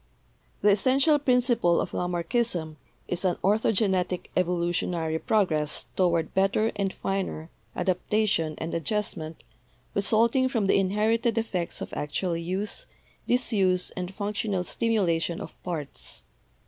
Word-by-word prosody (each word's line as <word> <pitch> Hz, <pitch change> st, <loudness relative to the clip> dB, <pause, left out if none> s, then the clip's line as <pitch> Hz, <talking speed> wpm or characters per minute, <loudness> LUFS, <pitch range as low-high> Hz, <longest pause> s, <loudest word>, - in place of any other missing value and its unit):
"The 205 Hz, -, +5 dB
essential 265 Hz, +9 st, +4 dB
principle 245 Hz, -9 st, +3 dB
of -, -, -2 dB
Lamarckism 175 Hz, -2 st, -1 dB, 0.3 s
is 180 Hz, +1 st, -2 dB
an 185 Hz, -2 st, +2 dB
ortho 210 Hz, +3 st, +3 dB
genetic 185 Hz, -4 st, 0 dB
evolutionary 170 Hz, -2 st, 0 dB
progress 155 Hz, -9 st, 0 dB
toward 170 Hz, -3 st, +1 dB
better 195 Hz, +3 st, +2 dB
and 200 Hz, -2 st, -1 dB
finer 190 Hz, -5 st, -3 dB, 0.2 s
adaptation 180 Hz, -3 st, 0 dB
and 160 Hz, +1 st, -4 dB
adjustment 165 Hz, -3 st, -3 dB, 0.5 s
resulting 230 Hz, +6 st, +3 dB
from 225 Hz, -6 st, 0 dB
the 195 Hz, -, +4 dB
inherited 220 Hz, +4 st, +1 dB
effects 185 Hz, -7 st, -2 dB
of -, -, -6 dB
actual 170 Hz, +4 st, -2 dB
use, 185 Hz, +5 st, -3 dB, 0.4 s
disuse, 195 Hz, -7 st, +2 dB
and 180 Hz, 0 st, -5 dB
functional 205 Hz, -2 st, -2 dB
stimulation 180 Hz, -7 st, 0 dB
of -, -, -8 dB
parts. 160 Hz, -6 st, -6 dB
190 Hz, 115 wpm, -27 LUFS, 170-220 Hz, 0.5 s, The